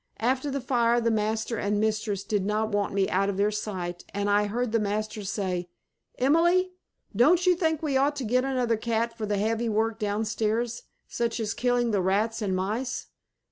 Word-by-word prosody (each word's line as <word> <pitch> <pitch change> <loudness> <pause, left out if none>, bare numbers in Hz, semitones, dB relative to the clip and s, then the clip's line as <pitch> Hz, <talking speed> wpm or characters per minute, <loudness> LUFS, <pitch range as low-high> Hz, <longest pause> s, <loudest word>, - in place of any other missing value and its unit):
After 260 +5 0
the 275 0 -2
fire 240 -2 +2
the 230 -1 +1
master 220 +1 -1
and 205 0 0
mistress 215 -2 -1
did 205 -3 -1
not 215 +2 0
want 205 -1 0
me 195 -1 +1
out 195 +2 +1
of 195 - -3
their 205 +1 +2
sight 185 -4 -4
and 205 0 0
I 205 0 +3
heard 235 +2 -2
master 215 +1 -2
say, 185 -3 -2 0.5
"Emily, 345 +7 +3 0.4
don't 330 - +4
you 365 - +6
think 320 -2 0
we 280 -4 +1
ought 285 +2 +2
to 280 - -4
get 250 +3 +2
another 250 -4 0
cat 230 +1 -1
for 220 -2 -4
the 205 0 0
heavy 225 +3 0
work 220 +1 0
down 210 0 -1
stairs, 225 +2 -1 0.3
such 235 0 -2
as 220 -1 -1
killing 245 -1 +1
the 200 -3 +1
rats 210 +5 0
and 195 -3 0
mice?" 215 +7 -2
220 Hz, 190 wpm, -27 LUFS, 205-245 Hz, 0.5 s, you